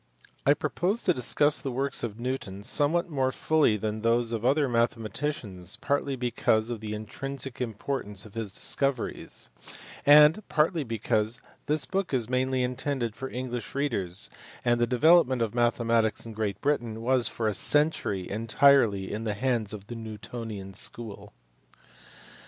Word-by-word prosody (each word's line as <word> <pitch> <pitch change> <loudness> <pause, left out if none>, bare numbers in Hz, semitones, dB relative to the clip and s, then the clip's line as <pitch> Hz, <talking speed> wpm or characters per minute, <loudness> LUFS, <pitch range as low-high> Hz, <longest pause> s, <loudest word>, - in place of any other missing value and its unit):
I 145 - +6
propose 180 +9 -1
to 180 - +3
discuss 145 +3 +4
the 135 - -3
works 135 +2 -1
of 115 -2 -5
Newton 120 -6 -4
somewhat 155 - +2
more 135 -5 0
fully 150 -7 +2
than 110 +1 -3
those 115 +1 +2
of 115 -1 -3
other 140 +3 +3
mathematicians, 115 - -2
partly 140 -1 -1
because 120 -2 +1
of 115 - -4
the 105 0 -5
intrinsic 135 +4 -6
importance 110 -3 -3
of 105 - -13
his 110 -3 -4
discoveries, 130 - -2 0.5
and 150 +6 +7
partly 155 +2 +2
because 115 -1 0 0.3
this 155 +1 +1
book 195 -7 -1
is 120 -1 -1
mainly 130 0 +1
intended 125 -2 -2
for 135 +2 -6
English 125 -2 -5
readers 105 -10 0 0.3
and 120 0 +2
the 120 - +3
develop 160 +6 +5
ment 130 -2 0
of 115 - -3
mathematics 115 -2 +1
in 115 - -8
Great 105 -2 -2
Britain 120 -6 -1
was 125 0 +2
for 115 - -2
a 105 - +1
century 110 - 0
entirely 115 -2 +3
in 110 +2 -3
the 105 -2 -2
hands 115 -2 0
of 100 -2 -8
the 120 - -8
Newtonian 110 -2 -7
school. 110 +2 -5
120 Hz, 150 wpm, -27 LUFS, 110-140 Hz, 0.5 s, and